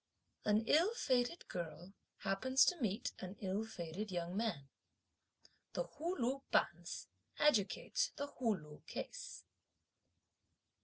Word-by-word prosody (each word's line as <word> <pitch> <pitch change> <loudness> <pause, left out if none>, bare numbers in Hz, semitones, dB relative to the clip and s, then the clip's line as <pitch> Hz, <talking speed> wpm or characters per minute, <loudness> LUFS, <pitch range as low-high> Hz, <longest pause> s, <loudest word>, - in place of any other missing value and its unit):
An 210 +1 +4
ill 345 - +5
fated 255 - +1
girl 170 +2 -5 0.3
happens 260 +8 +4
to 350 -4 +2
meet 210 -3 0
an 185 +1 -5
ill 195 +2 0
fated 195 -1 -4
young 175 -1 -2
man. 195 -11 -1 1.1
The - - +1
Hu 345 -4 -3
Lu 260 +2 +1
Bonze 170 0 +1 0.3
adjudicates 300 - +3
the 285 - -2
Hu 245 -6 +1
Lu 150 -2 -12
case. - - -5
215 Hz, 115 wpm, -38 LUFS, 180-275 Hz, 1.1 s, ill